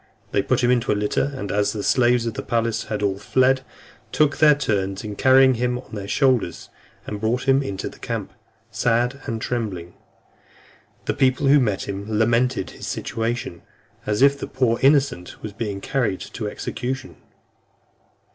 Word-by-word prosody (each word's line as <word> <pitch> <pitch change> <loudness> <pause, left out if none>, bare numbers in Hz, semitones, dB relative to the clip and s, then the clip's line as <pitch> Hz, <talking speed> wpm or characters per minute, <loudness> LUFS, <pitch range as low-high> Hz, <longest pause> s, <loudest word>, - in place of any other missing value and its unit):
They - - +2
put - - 0
him 120 - +4
into 120 -2 +1
a 105 - +1
litter, 105 +7 0
and 100 -7 -5
as 105 0 +1
the 105 -2 -4
slaves 120 -1 +3
of 115 - -2
the - - -4
palace 115 -1 -1
had 105 -1 -3
all 100 -1 0
fled, 130 +4 +2 0.5
took 150 -2 +2
their 150 -1 +6
turns 100 -8 -1
in 105 -1 -5
carrying 130 +1 +5
him 125 +1 -1
on 125 - -12
their 100 -2 -5
shoulders, 130 -8 +1 0.4
and 105 -1 -6
brought 120 +4 -1
him 135 +1 +4
into 100 -8 -4
the - - -11
camp, - - -4 0.4
sad 120 +3 0
and 115 -1 -2
trembling; 105 -8 -4 1.1
the - - 0
people 130 0 +2
who 140 +2 +6
met 105 -7 -1
him 100 +1 -5
lamenting 115 0 +2
his - - -9
situation, 115 -6 -3 0.5
as 105 +4 +2
if 140 0 +5
the - - -5
poor 125 -3 0
innocent 135 -10 +2
was 105 - -6
being 105 -3 -4
carried 120 -8 -1
to 110 - -5
execution. 130 +5 -5
120 Hz, 170 wpm, -22 LUFS, 105-130 Hz, 1.1 s, their